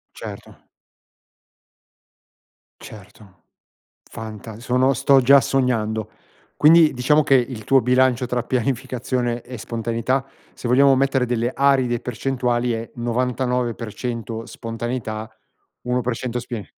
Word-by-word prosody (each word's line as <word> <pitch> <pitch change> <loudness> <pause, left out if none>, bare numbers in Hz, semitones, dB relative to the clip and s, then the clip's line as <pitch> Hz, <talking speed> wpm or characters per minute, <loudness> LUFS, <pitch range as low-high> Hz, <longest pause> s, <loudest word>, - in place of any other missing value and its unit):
Certo. - - -10 2.2
Certo. 105 -2 -14 0.7
Fanta 110 0 -9
sono 125 +3 +2
sto 135 +2 +4
già 140 +3 +7
sognando. 110 -5 -1 0.5
Quindi, 160 0 +6
diciamo 145 +5 +3
che, 135 - +4
il 120 -3 -1
tuo 135 +2 +4
bilancio 125 0 +2
tra 125 0 -2
pianificazione 125 -1 -2
e 125 -1 -9
spontaneità, 115 +4 -2 0.3
se 120 - -6
vogliamo 135 +2 +5
mettere 135 -1 +1
delle 120 0 -1
aride 130 -4 +2
percentuali, 125 -1 -1
è: 115 +1 -5
99% 120 -2 -3
spontaneità, 115 -1 -5 0.5
1% 125 0 -2
spin 115 -3 -6
125 Hz, 100 wpm, -21 LUFS, 115-130 Hz, 2.2 s, già